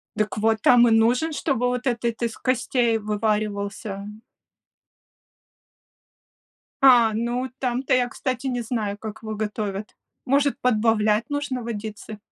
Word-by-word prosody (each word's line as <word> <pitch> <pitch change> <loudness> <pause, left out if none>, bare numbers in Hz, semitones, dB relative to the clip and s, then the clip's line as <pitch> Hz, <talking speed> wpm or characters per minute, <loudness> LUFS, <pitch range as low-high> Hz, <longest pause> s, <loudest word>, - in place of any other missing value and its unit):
Дак 215 0 -1
вот, 220 +1 +2
там 240 0 +6
и - - +3
нужен, 240 +8 +3
чтобы 270 -5 0
вот 250 +1 -2
этот 235 -1 -1
из 235 -1 -2
костей 245 -2 +1
вываривался. 210 -1 -2 2.8
А, 245 -4 +7
ну, 240 +3 -2
там-то 255 0 -1
я, 250 -1 +3
кстати, 255 +1 -3
не 245 -2 -1
знаю, 215 -3 -3
как 215 0 -8
его 215 0 -4
готовят. 210 -1 -4 0.3
Может, 280 +2 +1
подбавлять 220 -1 +2
нужно 290 -3 -2
водицы? 215 -1 -6
230 Hz, 120 wpm, -23 LUFS, 215-250 Hz, 2.8 s, А